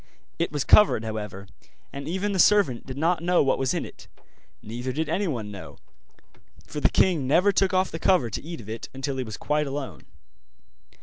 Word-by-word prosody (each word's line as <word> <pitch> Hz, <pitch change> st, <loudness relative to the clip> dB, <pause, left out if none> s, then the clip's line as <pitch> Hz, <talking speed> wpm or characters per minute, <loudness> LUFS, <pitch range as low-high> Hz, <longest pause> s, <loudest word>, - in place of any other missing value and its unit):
It 170 Hz, -, 0 dB
was 145 Hz, -2 st, -1 dB
covered, 210 Hz, -, +5 dB
however, 105 Hz, -3 st, -6 dB, 0.5 s
and 140 Hz, +1 st, -6 dB
even 190 Hz, +5 st, -1 dB
the 190 Hz, -, -2 dB
servant 170 Hz, -, +3 dB
did 130 Hz, 0 st, -7 dB
not 165 Hz, +3 st, +1 dB
know 175 Hz, -1 st, +3 dB
what 135 Hz, -, +1 dB
was 135 Hz, -1 st, 0 dB
in -, -, -2 dB
it, -, -, -13 dB, 0.6 s
neither 120 Hz, +4 st, -5 dB
did 155 Hz, +5 st, -2 dB
anyone 130 Hz, -, -2 dB
know, 100 Hz, -2 st, -10 dB, 0.9 s
for 150 Hz, -, -6 dB
the -, -, +3 dB
king 165 Hz, -8 st, +2 dB
never 180 Hz, +9 st, +4 dB
took 195 Hz, -1 st, +2 dB
off 185 Hz, 0 st, +1 dB
the 165 Hz, -, -5 dB
cover 160 Hz, -11 st, +2 dB
to -, -, -4 dB
eat 165 Hz, -1 st, -7 dB
of 105 Hz, -, -14 dB
it 110 Hz, +1 st, -6 dB
until 135 Hz, 0 st, -3 dB
he 130 Hz, -, -1 dB
was 110 Hz, -3 st, -7 dB
quite 150 Hz, 0 st, -1 dB
alone. 135 Hz, 0 st, -6 dB
145 Hz, 195 wpm, -25 LUFS, 120-175 Hz, 0.9 s, covered